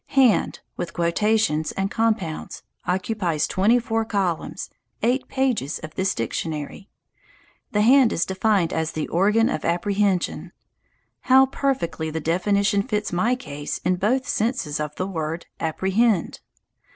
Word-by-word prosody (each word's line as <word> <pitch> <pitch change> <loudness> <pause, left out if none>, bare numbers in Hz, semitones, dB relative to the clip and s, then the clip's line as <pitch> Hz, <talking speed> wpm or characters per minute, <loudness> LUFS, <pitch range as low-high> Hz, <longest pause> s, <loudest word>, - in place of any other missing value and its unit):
"Hand," 255 -6 +4 0.2
with 175 - -4
quotations 170 -2 +1
and 195 +1 -2
compounds, 215 -8 -1 0.2
occupies 180 -4 0
twenty 210 +6 +3
four 225 -2 0
columns, 195 -7 -2 0.3
eight 250 +3 +1
pages 255 - 0
of 155 0 -9
this 190 0 0
dictionary. 150 - -4 0.8
The 210 0 +2
hand 255 0 +6
is 165 - 0
defined 190 -2 +1
as 160 0 -1
"the 155 - -3
organ 210 +6 +3
of 155 - -2
apprehension." 190 +2 0 0.8
How 265 +1 +8
perfectly 260 - -2
the 160 +1 -3
definition 200 +5 +1
fits 210 -3 -2
my 225 +8 +2
case 145 - -5
in 180 0 +2
both 250 +8 +1
senses 215 - -1
of 150 -1 -4
the 185 - -2
word 165 -3 -4
"apprehend"! 190 +4 +1
195 Hz, 130 wpm, -23 LUFS, 165-225 Hz, 0.8 s, How